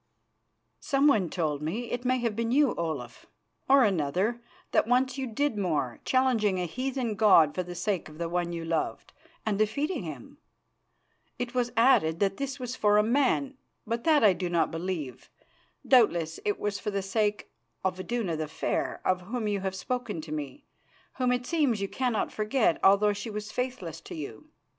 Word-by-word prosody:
"Someone 275 Hz, -, +3 dB
told 150 Hz, -5 st, -2 dB
me 215 Hz, +11 st, -3 dB
it 245 Hz, 0 st, -3 dB
may 255 Hz, +1 st, +2 dB
have 235 Hz, -3 st, -1 dB
been 230 Hz, +1 st, -1 dB
you, 285 Hz, 0 st, +4 dB
Olaf, 150 Hz, -8 st, -5 dB, 0.4 s
or 275 Hz, -1 st, +7 dB
another 195 Hz, +5 st, 0 dB, 0.3 s
that -, -, +3 dB
once 250 Hz, +1 st, +2 dB
you 265 Hz, -1 st, -3 dB
did 235 Hz, 0 st, -1 dB
more, 150 Hz, -10 st, -1 dB
challenging 230 Hz, -7 st, +2 dB
a 180 Hz, -, -1 dB
heathen 255 Hz, +4 st, -2 dB
god 190 Hz, -8 st, +5 dB
for 185 Hz, -, -1 dB
the 175 Hz, 0 st, -7 dB
sake 180 Hz, -1 st, -2 dB
of 155 Hz, +1 st, -14 dB
one 175 Hz, -1 st, -1 dB
you 165 Hz, -1 st, -4 dB
loved, 165 Hz, -1 st, -2 dB, 0.3 s
and 210 Hz, -2 st, 0 dB
defeating 280 Hz, -, 0 dB
him. 270 Hz, -, -9 dB, 1.0 s
It 245 Hz, 0 st, -4 dB
was 245 Hz, -1 st, 0 dB
added 170 Hz, -10 st, +4 dB
that 195 Hz, -1 st, +1 dB
this 275 Hz, -1 st, -3 dB
was 250 Hz, 0 st, -4 dB
for 210 Hz, -3 st, +3 dB
a 210 Hz, -, +5 dB
man, 270 Hz, +3 st, +1 dB, 0.3 s
but 230 Hz, +1 st, -2 dB
that 310 Hz, -5 st, +4 dB
I 205 Hz, -3 st, +7 dB
do 180 Hz, 0 st, -3 dB
not 170 Hz, -2 st, +1 dB
believe. 165 Hz, -5 st, -5 dB, 0.6 s
Doubtless 170 Hz, -, +3 dB
it 205 Hz, -, 0 dB
was 205 Hz, -1 st, -2 dB
for -, -, -3 dB
the 200 Hz, -1 st, -2 dB
sake 210 Hz, +1 st, -1 dB, 0.3 s
of 185 Hz, 0 st, 0 dB
Iduna 185 Hz, -2 st, -2 dB
the 155 Hz, 0 st, -3 dB
Fair, 155 Hz, -, -2 dB
of 185 Hz, -1 st, +2 dB
whom 220 Hz, +4 st, -3 dB
you 205 Hz, -1 st, 0 dB
have 190 Hz, 0 st, -3 dB
spoken 215 Hz, -1 st, -3 dB
to 155 Hz, -1 st, -10 dB
me, 155 Hz, -, -5 dB, 0.5 s
whom 250 Hz, -1 st, +2 dB
it 245 Hz, 0 st, -1 dB
seems 280 Hz, -8 st, +1 dB
you 195 Hz, -, -1 dB
cannot 245 Hz, 0 st, -1 dB
forget 215 Hz, -4 st, +1 dB
although 200 Hz, +2 st, +5 dB
she 205 Hz, +3 st, -6 dB
was 210 Hz, 0 st, -5 dB
faithless 250 Hz, -10 st, -4 dB
to -, -, -9 dB
you. 140 Hz, -8 st, -8 dB
210 Hz, 180 wpm, -28 LUFS, 175-250 Hz, 1.0 s, or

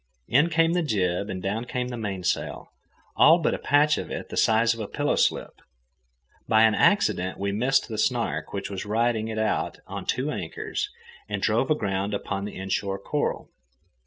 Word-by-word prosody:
In 150 Hz, +7 st, +4 dB
came 165 Hz, 0 st, +3 dB
the 180 Hz, -, +2 dB
jib, 100 Hz, -, 0 dB
and 95 Hz, -1 st, -5 dB
down 110 Hz, +5 st, -2 dB
came 125 Hz, 0 st, -3 dB
the 125 Hz, -, -5 dB
mainsail, 100 Hz, -5 st, -3 dB, 0.5 s
all 165 Hz, -, +7 dB
but 170 Hz, -, 0 dB
a -, -, -3 dB
patch 150 Hz, +1 st, +3 dB
of -, -, -6 dB
it -, -, -6 dB
the -, -, -6 dB
size 115 Hz, +1 st, +3 dB
of 115 Hz, -, -10 dB
a 105 Hz, -, -4 dB
pillow 145 Hz, +5 st, 0 dB
slip. -, -, +1 dB, 1.0 s
By 110 Hz, 0 st, +5 dB
an 110 Hz, -1 st, +5 dB
accident 95 Hz, -, +2 dB
we 100 Hz, 0 st, -2 dB
missed 130 Hz, +6 st, +1 dB
the 110 Hz, -2 st, -5 dB
Snark, -, -, -1 dB
which -, -, -4 dB
was 95 Hz, -, -4 dB
riding 110 Hz, +1 st, 0 dB
it 110 Hz, -1 st, -4 dB
out 110 Hz, 0 st, -1 dB
to -, -, -6 dB
two 135 Hz, +4 st, 0 dB
anchors, 85 Hz, -, -4 dB, 0.4 s
and 100 Hz, -1 st, -2 dB
drove 110 Hz, +6 st, +1 dB
aground 100 Hz, -7 st, 0 dB
upon 100 Hz, 0 st, -3 dB
the 105 Hz, -, -7 dB
inshore 95 Hz, +1 st, -2 dB
coral. 145 Hz, +9 st, -3 dB
110 Hz, 185 wpm, -25 LUFS, 100-135 Hz, 1.0 s, all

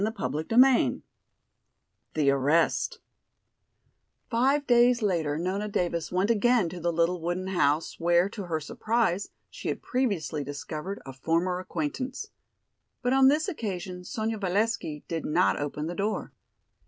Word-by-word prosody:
CHAPTER 155 Hz, -, -2 dB
VI 260 Hz, 0 st, +5 dB, 1.1 s
The 145 Hz, -3 st, +3 dB
Arrest 145 Hz, +5 st, +1 dB, 1.3 s
Five 270 Hz, +5 st, +2 dB
days 240 Hz, -1 st, +4 dB
later 165 Hz, -7 st, 0 dB
Nona 190 Hz, +5 st, -2 dB
Davis 170 Hz, -5 st, -2 dB
went 185 Hz, +5 st, +2 dB
again 230 Hz, -3 st, +3 dB
to 175 Hz, +1 st, -7 dB
the 170 Hz, +1 st, 0 dB
little 170 Hz, +1 st, +1 dB
wooden 175 Hz, +2 st, -2 dB
house, 165 Hz, -5 st, 0 dB
where, 175 Hz, +2 st, +3 dB
to 200 Hz, -2 st, -6 dB
her 165 Hz, -3 st, -1 dB
surprise, 205 Hz, +4 st, -1 dB, 0.2 s
she -, -, -7 dB
had -, -, -3 dB
previously 195 Hz, -, -1 dB
discovered 150 Hz, +7 st, -6 dB
a 135 Hz, -, -8 dB
former 170 Hz, +6 st, 0 dB
acquaintance. 220 Hz, -, -4 dB, 0.7 s
But 245 Hz, +1 st, +2 dB
on 265 Hz, 0 st, +6 dB
this 300 Hz, +5 st, +3 dB
occasion 190 Hz, -, -4 dB
Sonya 220 Hz, +3 st, -3 dB
Valesky 195 Hz, -5 st, -1 dB
did 165 Hz, -2 st, -3 dB
not 170 Hz, +4 st, +2 dB
open 145 Hz, +1 st, -3 dB
the 170 Hz, -, -3 dB
door. 205 Hz, +4 st, -2 dB
180 Hz, 135 wpm, -27 LUFS, 160-225 Hz, 1.3 s, on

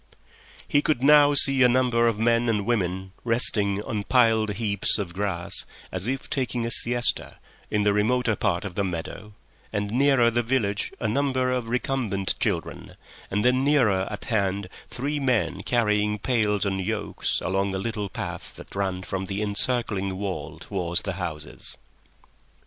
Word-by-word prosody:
He 145 Hz, -, +3 dB
could 145 Hz, -4 st, 0 dB
now 145 Hz, 0 st, +6 dB
see 135 Hz, -1 st, +5 dB
a 125 Hz, -, +7 dB
number 120 Hz, -2 st, +3 dB
of 115 Hz, -3 st, +1 dB
men 115 Hz, +1 st, +2 dB
and 105 Hz, -3 st, 0 dB
women 95 Hz, -5 st, -1 dB
resting 105 Hz, -4 st, +2 dB
on 110 Hz, -5 st, -3 dB
piled 110 Hz, -3 st, +3 dB
heaps 100 Hz, -3 st, +1 dB
of 95 Hz, -5 st, -4 dB
grass, 95 Hz, -3 st, -3 dB, 0.4 s
as 95 Hz, +3 st, -4 dB
if 135 Hz, +1 st, -3 dB
taking 125 Hz, -3 st, -2 dB
a 115 Hz, -, -2 dB
siesta, 120 Hz, +1 st, +2 dB, 0.3 s
in 105 Hz, -1 st, +1 dB
the 105 Hz, 0 st, +3 dB
remoter 115 Hz, +2 st, +1 dB
part 95 Hz, -3 st, -1 dB
of 95 Hz, -, -5 dB
the 100 Hz, -, -1 dB
meadow, 95 Hz, +3 st, -5 dB, 0.4 s
and 105 Hz, -1 st, -2 dB
nearer 125 Hz, -1 st, +4 dB
the 120 Hz, +1 st, +1 dB
village 115 Hz, -4 st, -1 dB
a 110 Hz, -, -1 dB
number 130 Hz, +1 st, 0 dB
of 125 Hz, -3 st, -2 dB
recumbent 120 Hz, -6 st, -1 dB
children, 105 Hz, -11 st, -3 dB, 0.3 s
and 105 Hz, +3 st, -1 dB
then 125 Hz, +1 st, +3 dB
nearer 115 Hz, -10 st, +3 dB
at -, -, -7 dB
hand 100 Hz, -3 st, -1 dB, 0.2 s
three 145 Hz, +4 st, -3 dB
men 110 Hz, -10 st, 0 dB
carrying 105 Hz, -2 st, +1 dB
pails 105 Hz, -3 st, 0 dB
on 95 Hz, -1 st, -1 dB
yokes 105 Hz, +4 st, -2 dB
along 95 Hz, +1 st, -1 dB
a -, -, -1 dB
little 105 Hz, 0 st, -3 dB
path -, -, -6 dB
that -, -, -12 dB
ran 95 Hz, -2 st, -2 dB
from 95 Hz, +1 st, -4 dB
the 95 Hz, +1 st, -4 dB
encircling 105 Hz, -2 st, 0 dB
wall 95 Hz, -7 st, -5 dB
towards 85 Hz, -3 st, -2 dB
the 100 Hz, -, -3 dB
houses. 75 Hz, -4 st, -5 dB
105 Hz, 160 wpm, -25 LUFS, 100-125 Hz, 0.4 s, a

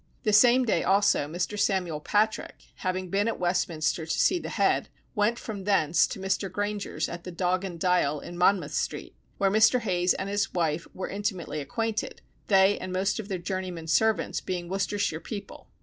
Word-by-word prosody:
The 215 Hz, -, +1 dB
same 245 Hz, +4 st, +6 dB
day 205 Hz, -7 st, +1 dB
also 195 Hz, -6 st, +3 dB
Mr. 180 Hz, +6 st, -3 dB
Samuel 180 Hz, -6 st, 0 dB
Patrick, 210 Hz, +7 st, 0 dB, 0.2 s
having 185 Hz, -1 st, -3 dB
been 205 Hz, +2 st, +1 dB
at 230 Hz, -, -1 dB
Westminster 170 Hz, -2 st, -1 dB
to 160 Hz, -, -1 dB
see 365 Hz, -, +3 dB
the -, -, -6 dB
head, -, -, +1 dB, 0.2 s
went 210 Hz, +2 st, +1 dB
from 205 Hz, -5 st, -7 dB
thence 175 Hz, -6 st, +3 dB
to -, -, -7 dB
Mr. 190 Hz, 0 st, -1 dB
Grainger's 205 Hz, +1 st, -2 dB
at 170 Hz, 0 st, -7 dB
the 180 Hz, -, -7 dB
Dog 180 Hz, +1 st, 0 dB
and 175 Hz, -3 st, -6 dB
Dial 160 Hz, -5 st, +2 dB
in 175 Hz, -, -9 dB
Monmouth 180 Hz, -4 st, +2 dB
Street, -, -, -3 dB, 0.2 s
where 195 Hz, -1 st, +2 dB
Mr. 220 Hz, +4 st, +5 dB
Hayes 180 Hz, -4 st, +1 dB
and 195 Hz, -, -4 dB
his 205 Hz, -1 st, -1 dB
wife 165 Hz, -2 st, 0 dB
were 190 Hz, -, -4 dB
intimately 195 Hz, -6 st, -3 dB
acquainted, 225 Hz, +8 st, -3 dB, 0.2 s
they 195 Hz, 0 st, +4 dB
and 185 Hz, -, -6 dB
most 190 Hz, +3 st, 0 dB
of 210 Hz, -, -6 dB
their 195 Hz, -3 st, -2 dB
journeymen 180 Hz, -2 st, -4 dB
servants 220 Hz, +4 st, +1 dB
being 180 Hz, -2 st, -4 dB
Worcestershire 195 Hz, -3 st, -1 dB
people. 205 Hz, +3 st, -8 dB
190 Hz, 180 wpm, -27 LUFS, 175-205 Hz, 0.2 s, same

